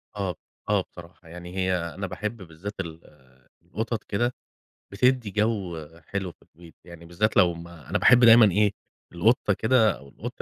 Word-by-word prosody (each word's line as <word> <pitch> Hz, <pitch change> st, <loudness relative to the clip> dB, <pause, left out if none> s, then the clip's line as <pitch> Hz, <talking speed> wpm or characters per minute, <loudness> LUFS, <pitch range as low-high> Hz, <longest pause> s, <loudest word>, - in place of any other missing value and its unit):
آه، 95 Hz, -4 st, -3 dB, 0.3 s
آه 105 Hz, -2 st, +3 dB
بصراحة، 85 Hz, 0 st, -14 dB
يعني 90 Hz, +1 st, -10 dB
هي 95 Hz, -1 st, +1 dB
أنا 90 Hz, +3 st, -5 dB
باحب 105 Hz, +5 st, -5 dB
بالذات 90 Hz, +4 st, -9 dB
ال 80 Hz, -3 st, -5 dB, 0.6 s
القطط 110 Hz, +2 st, -4 dB
كده، 120 Hz, +4 st, -1 dB, 0.6 s
بتدّي 120 Hz, 0 st, +1 dB
جو 95 Hz, -8 st, -1 dB, 0.2 s
حلو 95 Hz, 0 st, -4 dB
في -, -, -33 dB
البيت، 85 Hz, 0 st, -18 dB
يعني 85 Hz, -1 st, -12 dB
بالذات 100 Hz, +6 st, -1 dB
لو 85 Hz, -1 st, +5 dB
ما 85 Hz, -4 st, -12 dB
أنا -, -, +1 dB
باحب 125 Hz, -1 st, +6 dB
دايمًا 115 Hz, -3 st, +8 dB
إيه 105 Hz, +2 st, +3 dB, 0.4 s
القطة 105 Hz, +3 st, +2 dB
كده 110 Hz, 0 st, +3 dB
أو 70 Hz, +2 st, -15 dB
القط -, -, -8 dB
95 Hz, 160 wpm, -25 LUFS, 85-110 Hz, 0.6 s, دايمًا